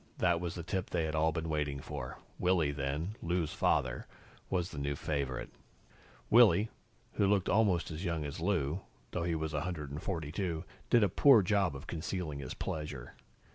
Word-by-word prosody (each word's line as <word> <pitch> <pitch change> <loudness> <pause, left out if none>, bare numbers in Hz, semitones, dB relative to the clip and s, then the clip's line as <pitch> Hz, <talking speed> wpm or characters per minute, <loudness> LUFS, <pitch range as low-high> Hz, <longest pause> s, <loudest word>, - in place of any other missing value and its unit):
That 85 -1 +3
was 85 -2 -3
the 85 - -5
tip 95 +1 -2
they 85 -2 0
had 80 - -2
all 80 +1 +3
been 80 +1 -3
waiting 75 -3 -1
for. - - -6 0.2
Willy, 90 -5 +3
then 75 +8 -2
Lou's 85 -2 -1
father 65 -2 +1 0.4
was 90 -1 0
the 70 - -5
new 70 0 -1
favorite. 70 -3 -2 0.8
Willy, 115 -2 +6 0.4
who 100 - +2
looked 100 -2 +2
almost 95 -5 +3
as 80 +3 -5
young 85 -4 -1
as 70 +1 -5
Lou, 85 -2 0 0.3
though 85 -1 -1
he 85 -1 0
was 80 0 -2
142, 80 +2 -3 0.3
did 120 -3 +6
a - - +5
poor 115 +3 +6
job 95 -4 +2
of 70 - -8
concealing 80 -2 -3
his 65 -3 -6
pleasure. 75 -6 -5
80 Hz, 170 wpm, -33 LUFS, 75-90 Hz, 0.8 s, Willy